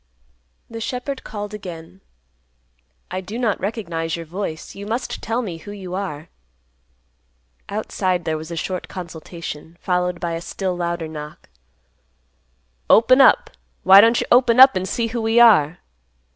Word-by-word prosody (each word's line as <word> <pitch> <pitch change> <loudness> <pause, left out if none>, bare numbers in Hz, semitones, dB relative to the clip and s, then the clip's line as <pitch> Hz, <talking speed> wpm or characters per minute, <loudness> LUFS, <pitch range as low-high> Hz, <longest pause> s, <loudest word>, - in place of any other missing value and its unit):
The 230 0 -8
shepherd 255 +4 -4
called 205 -1 -6
again, 180 -2 -9 1.1
"I 185 +1 -3
do 200 +5 -7
not 230 -5 0
recognize 170 -6 -3
your 165 -1 -7
voice. 165 -1 -6
You 200 +1 -9
must 235 +4 -3
tell 230 +3 -2
me 180 -7 -5
who 205 +5 -10
you 190 -3 -8
are." 170 -5 -5 1.4
Outside 180 -2 -2
there 160 -1 -1
was 155 +1 -7
a 170 - -5
short 180 +2 -4
consultation, 165 -2 -8
followed 180 -1 -1
by 170 -1 -3
a 165 0 -4
still 185 +1 -3
louder 170 -1 -3
knock; 150 -1 -9 1.4
"Open 255 +4 +6
up. 270 - +5 0.3
Why 195 +1 +9
don't 230 +2 +4
you - - -1
open 245 -1 +5
up 265 -2 +9
an' 185 0 -2
see 230 +4 -1
who 235 +1 -3
we 225 +1 +2
are?" 180 -9 +6
185 Hz, 150 wpm, -21 LUFS, 170-225 Hz, 1.4 s, Why